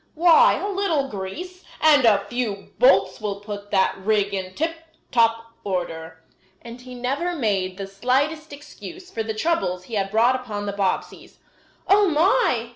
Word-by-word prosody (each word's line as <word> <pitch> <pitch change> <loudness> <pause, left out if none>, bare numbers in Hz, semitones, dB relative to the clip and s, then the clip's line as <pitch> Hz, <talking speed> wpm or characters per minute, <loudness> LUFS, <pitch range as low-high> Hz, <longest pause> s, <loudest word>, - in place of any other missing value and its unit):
Why, 350 +9 +6
a - - -3
little 375 -9 -1
grease 305 - -7 0.2
and 295 -5 +5
a 205 -3 +4
few 230 -5 -4
bolts - - +4
will 200 -2 -3
put 205 0 -8
that 190 - +2
rig 205 0 0
in 185 -1 -4
tip 325 +1 -1 0.4
top 230 -1 +1
order." 165 -4 -4 0.4
And 235 +1 -10
he 250 0 -10
never 275 +9 -2
made 195 - -1
the 195 - -5
slightest 270 +10 -1
excuse 340 +5 -11
for 225 - -3
the 220 0 -4
troubles 215 - -1
he 225 - -13
had 195 -2 -1
brought 230 +5 +3
upon 215 -5 -5
the 200 - -3
Bobbseys. 195 -2 -3 0.5
"Oh, 405 +1 +5
my!" 305 - +2
230 Hz, 160 wpm, -23 LUFS, 200-310 Hz, 0.5 s, Why